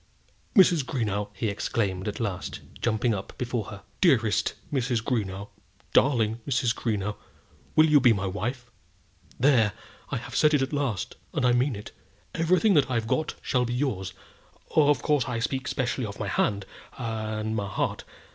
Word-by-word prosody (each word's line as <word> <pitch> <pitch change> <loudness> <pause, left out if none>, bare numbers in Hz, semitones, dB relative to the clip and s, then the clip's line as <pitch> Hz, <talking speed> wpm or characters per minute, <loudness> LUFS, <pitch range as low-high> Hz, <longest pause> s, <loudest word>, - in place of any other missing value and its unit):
"Mrs. 180 - +6
Greenow," 105 -6 -2
he 105 +2 -3
exclaimed 100 -2 -1
at 105 - -3
last, 100 -6 -3 0.2
jumping 115 0 +1
up 100 -1 -6
before 120 -3 -2
her; 100 -1 -9 0.2
"dearest 120 - +3 0.2
Mrs. 125 -3 +1
Greenow; 105 -4 -2 0.4
darling 115 -5 +3
Mrs. 125 -3 +2
Greenow, 105 -3 -2 0.6
will 155 - +7
you 150 -2 +6
be 125 -3 +6
my 100 -3 0
wife? 120 +6 -4 0.7
There! 120 -6 +4 0.4
I - - -1
have - - -7
said 150 -1 +4
it 135 - +2
at 135 - -4
last, 135 -9 -2 0.2
and - - +1
I 125 - +5
mean 125 +1 +2
it. 105 - -8 0.4
Everything 185 +6 +3
that 145 -5 +4
I've 115 -3 0
got 155 +7 -1
shall 125 -1 +1
be 120 0 -2
yours. 105 -9 -2 0.6
Of 145 -1 +4
course 145 -5 +2
I 125 -2 -2
speak 130 +3 -2
specially 125 -2 -1
of 100 - -8
my 100 - -2
hand 100 0 0 0.3
and 110 -2 -2
heart. 100 -1 -2
115 Hz, 160 wpm, -27 LUFS, 105-135 Hz, 0.7 s, will